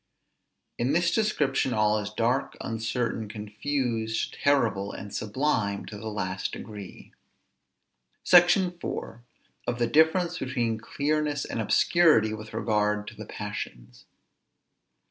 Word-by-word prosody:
In 125 +4 +1
this 170 +1 +3
description 145 - +1
all 105 0 +3
is 105 0 -5
dark, 120 +4 0
uncertain, 115 0 -2
confused, 110 +1 -2
terrible, 115 -8 +1
and 100 +1 -8
sublime 110 -3 -1
to 105 - -8
the 110 - -7
last 95 -3 -3
degree. 105 -4 -9 1.1
SECTION 175 +1 +6
IV. 115 - -5 0.5
OF 120 - -1
THE 120 - +2
DIFFERENCE 165 +6 +3
BETWEEN 120 -4 -1
CLEARNESS 145 +4 -1
AND 115 - -3
OBSCURITY 115 - +4
WITH 110 0 -8
REGARD 105 -1 0
TO - - -13
THE 110 -1 -9
PASSIONS. 60 -12 -7
115 Hz, 115 wpm, -27 LUFS, 105-145 Hz, 1.1 s, SECTION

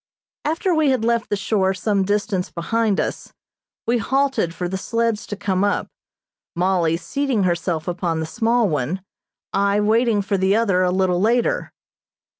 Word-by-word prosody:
After 330 +4 0
we 315 -3 +3
had 255 -4 +1
left 235 0 +1
the - - +1
shore 195 -1 0
some 200 0 0
distance 205 -2 -1
behind 215 +4 0
us - - -3 0.5
we 235 +1 +1
halted 265 -6 +1
for 175 +1 -4
the 185 - -4
sleds 230 +2 -1
to 205 - -4
come 190 -1 -1
up, 205 - 0 0.7
Mollie 175 -2 +1
seating 270 +1 -1
herself 175 -2 -1
upon 175 -2 -1
the 160 - -2
small 230 +5 +1
one, 155 +4 -2 0.5
I 200 +1 +2
waiting 220 0 +2
for 195 0 -1
the 190 +2 +3
other 200 -5 +2
a 180 - +3
little 185 -1 +1
later. 240 - +1
200 Hz, 160 wpm, -21 LUFS, 185-230 Hz, 0.7 s, we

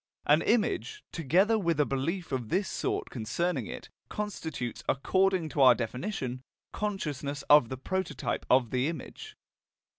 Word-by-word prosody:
An 150 +2 +5
image, 240 - 0
together 185 - +2
with 170 -5 0
a 150 - +4
belief 160 +7 -2
of 125 -5 -2
this 190 +2 +1
sort - - -2
concerning 130 - -2
it, - - -7 0.2
constitutes, 160 - -4
according 185 +4 +2
to 145 - -1
our 130 -2 +8
definition, 125 - -4 0.3
consciousness 145 -9 -3
of 145 -6 +7
the 130 - -4
prototype 190 +8 -3
of 125 -3 +4
the 130 +2 +1
image. 425 - -7
150 Hz, 140 wpm, -29 LUFS, 130-190 Hz, 0.3 s, our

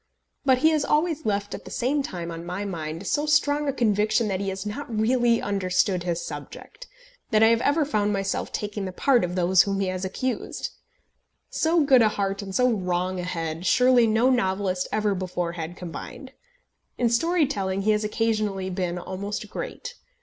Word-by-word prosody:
But 260 -2 +5
he 320 - +7
has 305 -2 +1
always 310 -2 0
left 205 -1 -1
at - - -7
the - - -10
same 275 +4 0
time 175 -9 -5
on 165 0 -7
my 180 +4 -4
mind 165 -1 -5
so 295 +9 0
strong 295 0 +2
a - - +2
conviction 215 -2 +1
that 190 -1 -1
he 195 0 -2
has 190 +1 -5
not 250 +7 -5
really 235 +1 +2
understood 185 -2 0
his 175 -1 -2
subject, - - -9 0.4
that 215 0 +4
I 225 - +7
have 230 0 +3
ever 295 +2 +2
found 210 -7 0
myself 195 -1 -2
taking 205 -1 -3
the 185 - -4
part 245 +5 +2
of 180 0 -2
those 180 0 +4
whom 195 0 -1
he 195 -1 0
has 185 0 -3
accused. 250 +7 -3 0.8
So 325 0 +2
good 265 -3 +6
a 220 - +5
heart, 195 -1 -2
and 195 -1 -7
so 250 - +4
wrong 185 -2 -1
a - - -3
head, 165 -1 -3
surely 250 -2 +5
no 225 +4 +3
novelist 190 -5 0
ever 210 -1 +1
before 180 -2 -3
had 170 +1 -6
combined! 180 - -8 0.7
In 245 - +2
story 330 +8 +2
telling 195 -7 -2
he 215 - +3
has 210 0 +1
occasionally 210 -3 -1
been 180 -1 -2
almost 200 +4 -5
great. - - -6
205 Hz, 190 wpm, -25 LUFS, 185-245 Hz, 0.8 s, he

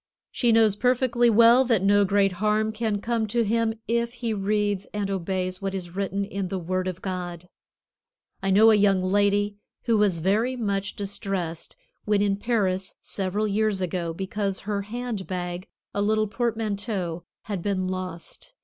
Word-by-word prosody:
She 240 -2 +2
knows 220 -3 +4
perfectly 245 0 +2
well 230 +3 +6
that 230 -7 +1
no 205 +1 +5
great 195 0 +3
harm 215 +1 +2
can 215 -2 -2
come 230 -1 -1
to 235 +3 +1
him, 225 +1 +1
if 235 +1 0
he 235 -2 -3
reads 205 -1 0
and 200 -1 -1
obeys 185 0 -2
what 195 0 -2
is 175 -2 -6
written 195 0 -1
in 195 -1 -4
the 190 - -3
Word 185 +1 -2
of 185 -1 -5
God. 180 -2 -5 0.9
I 195 - -1
know 215 +4 +7
a - - +6
young 200 -2 +3
lady 205 +1 +2 0.3
who 230 -3 +2
was 200 -5 +3
very 210 +9 +1
much 200 -4 -2
distressed 195 -4 -4 0.3
when 210 -1 +2
in 200 -1 +1
Paris 195 -4 -1
several 200 +2 -2
years 210 -1 +1
ago 175 -2 -2
because 195 +2 -3
her 200 0 -2
hand 225 -1 -5
bag, 180 0 -4 0.3
a 205 - -1
little 215 +1 +2
portmanteau, 210 -5 -2 0.2
had 200 -4 -4
been 185 -1 -1
lost. 185 - -6
200 Hz, 165 wpm, -25 LUFS, 190-220 Hz, 0.9 s, know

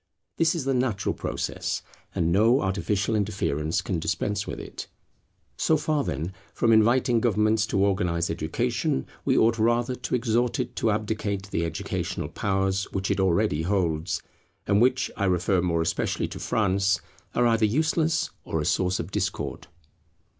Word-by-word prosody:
This 165 +1 +3
is 155 -6 -3
the 135 - +1
natural 125 -6 0
process, - - -3 0.3
and 85 0 +1
no 115 +8 +4
artificial 100 +2 0
interference 85 -7 -1
can 90 -4 -2
dispense 100 +4 -1
with - - -5
it. - - -8 0.7
So 160 - +3
far, 150 -1 0
then, 80 - -3 0.2
from 115 -1 +3
inviting 120 +2 +4
government 110 -1 +2
to 100 - 0
organize 90 -4 +1
education, 80 -4 -1 0.2
we - - +3
ought 115 +1 +3
rather 120 +2 +2
to 125 0 -2
exhort 120 0 +1
it - - -3
to 115 - +1
abdicate 105 -2 -2
the 85 - 0
educational 80 - -3
powers 95 -1 0
which 95 0 -1
it 100 - 0
already 95 -3 +2
holds, 85 -3 0 0.4
and 100 +1 +3
which, 130 +1 +2
I 100 - -1
refer 90 0 +2
more 85 -2 +1
especially - - -1
to - - -7
France, 100 -3 +1 0.4
are 120 - +3
either 115 -2 +3
useless 155 +7 +1
or 80 - -2
a 75 - -2
source 90 +1 +1
of 85 - -5
discord. - - -3
100 Hz, 155 wpm, -26 LUFS, 90-115 Hz, 0.7 s, no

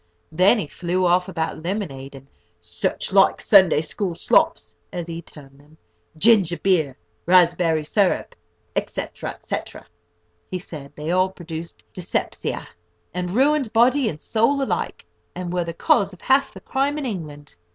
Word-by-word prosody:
Then 185 +8 +4
he 205 - -2
flew 180 +5 -2
off 180 +1 +2
about 160 -3 -3
lemonade, 155 -8 -4
and 135 0 -12 0.3
"such - - -1
like - - +5
Sunday 190 -8 +5
school 175 +2 -3
slops," 85 - +1 0.2
as 175 -1 -4
he 165 0 -6
termed 140 -4 -15
them, 150 +2 -22 0.4
ginger 190 -3 +5
beer, 160 -9 +1 0.3
raspberry 175 -3 +4
syrup, 190 +4 0 0.4
&c., - - -2 0.4
&c. - - -3 0.9
He 185 - -4
said 155 -6 -9
they 150 +2 -4
all 185 +1 +2
produced 170 -2 -9
dyspepsia, 180 -2 -3 0.5
and 180 0 -3
ruined 270 +3 +2
body 245 +2 +4
and 150 - -7
soul 255 - +1
alike, - - -3 0.3
and 180 -1 -5
were 175 -1 0
the 170 - -4
cause 195 +3 +2
of 180 - -15
half 270 +1 +2
the - - -12
crime 280 +2 -1
in 295 - -3
England. 150 - -7
180 Hz, 150 wpm, -22 LUFS, 160-210 Hz, 0.9 s, like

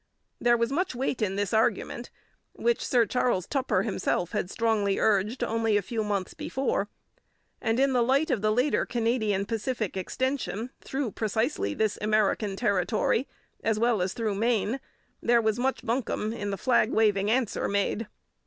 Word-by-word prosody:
There 240 0 +4
was 235 +2 0
much 335 -1 -1
weight 255 -1 -2
in 195 -2 0
this 205 +1 -1
argument, 220 0 0 0.4
which 475 -1 0
Sir 240 -2 +3
Charles 230 -5 0
Tupper 270 -2 0
himself 185 -4 -1
had 180 - -2
strongly 210 -3 +1
urged 215 +4 +1
only 225 -2 +1
a 205 - -1
few 225 +2 -2
months 200 -3 -2
before, 255 -6 -2 0.7
and 225 0 +1
in 270 0 +3
the 245 - +3
light 275 +6 +2
of 240 -6 0
the 215 0 +2
later 250 +6 +2
Canadian 225 -4 0
Pacific 225 -1 -2
extension 255 +3 -2
through 265 -4 -2
precisely 215 - -1
this 215 -2 0
American 210 -1 +1
territory 210 +4 +1 0.4
as 220 -1 +1
well 230 -3 +2
as 185 +1 -1
through 220 -3 -1
Maine, 225 +3 0 0.4
there 240 0 +4
was 220 0 0
much 265 +2 -1
buncombe 225 -2 -1
in 205 -3 -4
the 195 - -2
flag 245 -2 +3
waving 205 -2 +2
answer 240 -1 +1
made. 200 +2 -1
225 Hz, 160 wpm, -27 LUFS, 205-245 Hz, 0.7 s, There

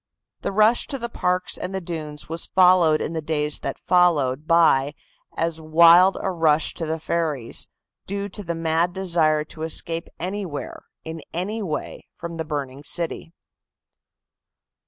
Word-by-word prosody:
The - - -2
rush 215 +4 +3
to 275 - -4
the 235 -2 -5
parks 180 -4 -1
and 190 - -4
the - - -1
dunes 155 -4 -6
was 165 +1 -3
followed 180 -4 +4
in 165 - -3
the 160 - -2
days 150 -1 0
that - - -4
followed 155 -6 +2
by 150 -4 +4 0.4
as 165 0 -1
wild 170 +4 +6
a 190 - -1
rush 160 -3 +2
to 165 - -5
the 160 +1 -2
ferries, 155 -7 -2 0.4
due 200 +1 -3
to 205 +2 -8
the 170 -2 -3
mad 165 +2 0
desire 165 -5 +1
to 155 +1 -9
escape 165 +1 -1
anywhere, 180 -4 -5 0.2
in 160 0 -7
any 200 +6 -2
way, 160 -7 -5
from 170 -1 -7
the 160 - -3
burning 140 -3 -5
city. 165 +1 -3
165 Hz, 155 wpm, -23 LUFS, 155-180 Hz, 0.4 s, wild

